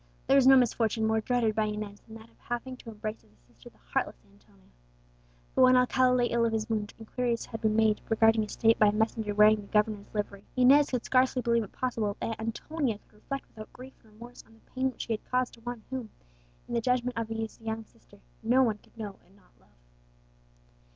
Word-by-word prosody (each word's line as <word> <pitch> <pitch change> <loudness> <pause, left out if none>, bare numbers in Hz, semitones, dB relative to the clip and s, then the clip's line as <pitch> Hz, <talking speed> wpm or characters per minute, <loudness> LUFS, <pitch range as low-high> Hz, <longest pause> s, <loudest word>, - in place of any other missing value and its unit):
There 275 - +4
was 270 -2 +5
no 270 0 +9
misfortune 230 -2 +1
more 220 0 +1
dreaded 235 -1 +1
by 220 0 +1
Inez 210 -1 -5
than 225 - -14
that 225 +1 -13
of - - -30
having 240 +2 -5
to 235 - -11
embrace 215 - -6
as 110 - -27
a - - -28
sister - - -16
the - - -28 0.2
heartless - - 0 0.2
Antonia. 65 +1 -26 0.8
But - - +2
when 255 0 +7
Alcala 250 0 +3
lay 245 -1 +3
ill 235 -1 +1
of 230 -1 +1
his 220 -1 -1
wound, 215 -2 -3
inquiries 235 +1 -2
had 225 -1 -7
been 215 -1 +1
made 220 -1 +3
regarding 225 0 +4
his 210 - -4
state 225 0 +3
by 215 - +6
a - - +4
messenger 220 -1 -1
wearing 210 0 +6
the 200 - -13
governor's 210 -1 0
livery. 205 -2 -4
Inez 270 +3 +5
could 250 -3 -2
scarcely 255 -1 +2
believe 235 0 +2
it 205 - -10
possible 225 -5 -2
that 225 -1 -4
Antonia 230 +2 -2
could - - -31
reflect 275 +6 -6
without 215 -1 -11
grief 260 +1 -11
and 220 -2 -22
remorse 240 +3 -12
on 225 - -21
the 225 - -28
pain 260 0 0
which 255 - -8
she 230 - -2
had 215 - -7
caused 255 0 0
to 230 - -16
one 240 -1 -6
whom, 255 -4 -4 0.6
in - - -7
the 235 - +1
judgment 250 +1 0
of 230 -1 -2
his 225 0 -5
young 220 0 -4
sister, 210 -2 -22 0.2
no 245 +4 +4
one 220 -4 0
could - - -26
know 205 -3 -7
and 190 - -25
not 200 - -26
love. - - -28
225 Hz, 230 wpm, -29 LUFS, 215-250 Hz, 0.8 s, no